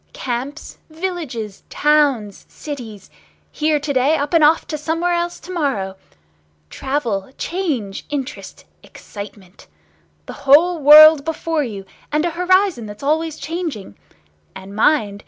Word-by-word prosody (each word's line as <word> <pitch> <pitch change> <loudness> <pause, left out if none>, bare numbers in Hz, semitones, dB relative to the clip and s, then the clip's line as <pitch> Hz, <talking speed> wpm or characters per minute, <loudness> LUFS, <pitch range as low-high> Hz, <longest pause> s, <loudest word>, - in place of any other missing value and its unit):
Camps, 260 +4 -5
villages, 310 - -5
towns, 280 -9 +1
cities! 235 -9 -9 0.4
Here 305 -1 0
to 290 0 -3
day, 270 +4 +2
up 290 0 -3
and 330 -2 +4
off 310 +2 +4
to 310 - -3
somewhere 330 +3 -1
else 345 0 -2
to 370 - -10
morrow! 265 - -2 0.8
Travel, 255 -7 -3
change, 290 - -3
interest, 290 0 -6 0.2
excitement! 200 -2 -12 0.6
The - - -8 0.2
whole 335 +5 +5
world 305 +1 +8
before 325 0 -2
you, 205 -6 -7 0.3
and 305 +2 +1
a 345 - -1
horizon 360 - +1
that's 205 +5 -11
always 315 +2 0
changing! 315 - -5 0.6
And 195 +1 -10
mind! 215 -4 +2
295 Hz, 125 wpm, -19 LUFS, 225-320 Hz, 0.8 s, world